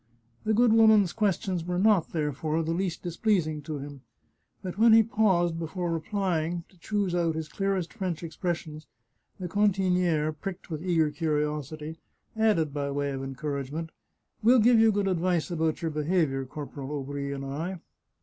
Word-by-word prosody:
The 215 0 +2
good 235 0 +5
woman's 220 -5 +5
questions 190 -4 0
were 180 +1 -2
not, 195 -3 +3
therefore, 155 +1 -1
the 160 - -2
least 180 -1 -2
displeasing 170 -4 0
to 150 0 -5
him, 140 -1 -8 0.6
but 185 -2 -5
when 225 0 +7
he 225 0 +8
paused 190 -7 +2
before 170 +1 -3
replying 170 -1 -1
to 185 - -23
choose 200 -1 -1
out 170 -2 +1
his 160 -1 -3
clearest 195 -1 -2
French 185 -6 -3
expressions, 160 -2 -4 0.5
the 180 - -4
cantiniere, 180 -5 +2
pricked 180 +3 -7
with 155 -1 -3
eager 165 -4 +2
curiosity, 150 0 -2 0.4
added 210 -10 +2
by 140 -1 -2
way 140 0 -1
of 135 -1 -4
encouragement, 140 +3 -4 0.3
" - - -48
We'll 240 +4 +6
give 235 0 +5
you 225 0 +6
good 200 -1 0
advice 180 -2 0
about 160 -1 -1
your 165 - 0
behaviour, 150 -3 0
Corporal 140 0 -7
Aubry 140 0 -4
and 135 -1 -5
I." 160 +7 -4
170 Hz, 160 wpm, -28 LUFS, 150-190 Hz, 0.6 s, he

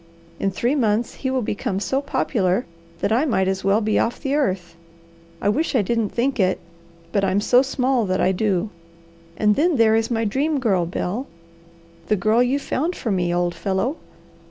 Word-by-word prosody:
In 195 - +1
three 235 +7 0
months 230 -4 +1
he 265 - -4
will 260 -2 0
become 200 -2 -2
so 265 +8 -1
popular 210 -7 0 0.4
that - - 0
I 235 +6 +3
might 190 -9 +1
as 190 0 -1
well 200 +3 +3
be 215 0 +1
off 235 - -1
the 275 -2 -2
earth. 185 - -1 0.6
I - - -2
wish 280 +8 +1
I 230 - +3
didn't 225 +1 0
think 260 +1 -1
it, 185 -1 +2 0.5
but 200 +1 +1
I'm 195 +1 +2
so 245 +4 +4
small 260 -4 0
that 185 0 0
I 190 - +3
do. 200 +1 0 0.7
And 210 -1 +3
then 330 +3 +2
there 225 -3 +4
is 225 0 +1
my 225 -2 0
Dream 280 +7 0
Girl, 190 -9 +1
Bel. 205 +9 -3 0.8
The 215 - +3
girl 215 +4 +2
you 250 +3 +2
found 310 +5 -2
for 225 - -3
me, 180 -2 0
old 175 0 0
fellow. 200 - -1
220 Hz, 190 wpm, -22 LUFS, 190-260 Hz, 0.8 s, so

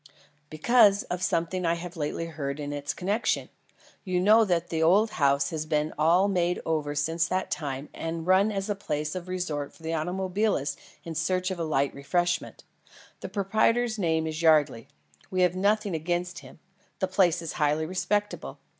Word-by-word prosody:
"Because 200 +5 +4
of 180 - -4
something 180 +1 0
I 170 0 +2
have 175 +1 -7
lately 160 +1 -3
heard 145 -3 -5
in 145 0 -4
its 145 0 -3
connection. 200 +5 -1 0.5
You 185 -2 0
know 215 +5 +6
that 175 -3 0
the 160 -1 -1
old 200 +7 +4
house 140 -1 +2
has 155 -1 -4
been 150 0 0
all 170 +6 +4
made 180 -3 0
over 150 -2 -1
since 165 +3 0
that 185 0 -2
time 140 -2 -3
and 165 0 -4
run 190 +4 +4
as 195 -1 -3
a 205 - 0
place 150 -6 -3
of 185 -1 -6
resort 170 -6 -3
for 165 - -19
automobilists 180 -1 -1 0.3
in 165 - -6
search 185 +4 0
of 185 - -4
light 140 -4 0
refreshments. 175 +5 -1 0.6
The - - -6
proprietor's 220 +3 +1
name 160 -3 +1
is 160 +1 -4
Yardley. 150 -7 +3 0.4
We 185 - 0
have 180 0 +2
nothing 205 +1 +1
against 175 +2 -2
him; - - -14 0.4
the 190 - 0
place 180 -2 +2
is 165 -2 -5
highly 150 +1 +2
respectable. 205 +4 -2
170 Hz, 170 wpm, -27 LUFS, 155-190 Hz, 0.6 s, know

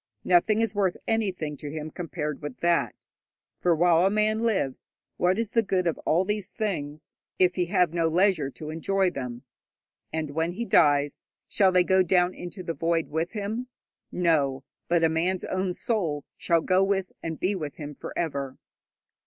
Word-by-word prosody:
Nothing 195 +5 +3
is 225 -2 0
worth 195 -3 +1
anything 190 -9 -1
to 145 - -7
him 155 +1 -5
compared 150 -4 -4
with 145 -3 -7
that, 170 0 +1 0.5
for 175 -2 +3
while 170 +1 +4
a 190 - +4
man 215 +1 +1
lives, 205 - -1 0.3
what 180 +2 +2
is 225 -2 -2
the 230 - +3
good 190 -4 0
of 170 - 0
all 175 +4 +3
these 210 -1 -2
things 155 -9 -4 0.2
if 180 -1 +4
he 180 -1 -1
have 175 -1 +2
no 165 -1 +2
leisure 170 -3 +2
to 150 +4 -8
enjoy 190 +3 +1
them? 125 -5 -6 0.7
And 160 -2 -3
when 160 +3 -1
he 235 +6 -3
dies, 145 -7 +3 0.3
shall 190 -2 +3
they 180 -1 +4
go 190 +1 +4
down 180 0 +3
into 180 +2 -8
the 165 - -3
void 165 0 0
with 165 +5 -2
him? 220 +4 -3 0.4
No; 145 -7 +1 0.2
but 170 -1 +2
a - - +6
man's 175 +3 0
own 185 0 -1
soul 175 - -1
shall 170 -1 +1
go 185 +3 +3
with 195 -1 0
and 160 -1 -5
be 190 +3 +1
with 155 -7 -5
him 150 -1 -7
for - - -8
ever. 140 -5 -2
175 Hz, 180 wpm, -26 LUFS, 155-190 Hz, 0.7 s, a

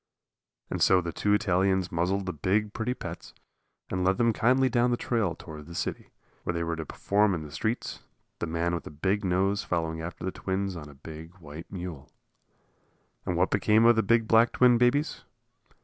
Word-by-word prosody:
And - - -2
so 95 - +6
the 85 -2 -4
two 105 0 +2
Italians 95 -2 +1
muzzled 90 +4 0
the 90 - -3
big, 105 +7 0
pretty 125 +3 -2
pets - - -8 0.6
and 90 0 -1
led 95 +1 +2
them 115 -1 +3
kindly 130 +4 +3
down 120 0 +2
the 120 - +1
trail 110 -10 0
toward 75 -2 -10
the 85 - -9
city, - - -4 0.3
where 90 - -3
they 85 - -1
were 85 0 -2
to 80 -2 -6
perform 100 -1 +1
in 80 - -5
the 75 - -10
streets, 110 - -3 0.4
the - - -2
man 85 +1 -1
with 85 - -2
the - - -8
big 95 +8 -1
nose 95 +2 +1
following 80 -2 -2
after 85 +2 -7
the 95 - -1
twins 95 0 -3
on 75 -3 -8
a 70 - -14
big 80 +4 -10
white 80 -2 -11
mule. 85 -6 -7 1.2
And 90 - 0
what 90 +2 +2
became 105 +3 +4
of 120 0 +7
the 110 - +3
big 115 +1 +2
black 115 +2 +5
twin 125 -2 +5
babies? 130 +5 +2
95 Hz, 195 wpm, -28 LUFS, 85-110 Hz, 1.2 s, of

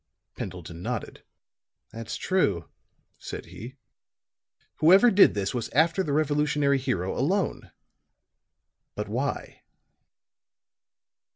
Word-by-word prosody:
Pendleton 85 -2 -7
nodded. - - -5 0.7
"That's 115 0 -6
true," 100 - 0 0.5
said - - -7
he. 125 +4 -10 1.0
"Whoever 190 +9 +6
did 195 - +6
this 100 -1 -2
was 120 -3 -3
after 165 +6 +3
the 155 - -2
Revolutionary 150 -1 +1
hero 110 -9 -2
alone. 180 +10 -1 1.3
But - - -4
why?" - - -4
140 Hz, 90 wpm, -26 LUFS, 100-160 Hz, 1.3 s, Whoever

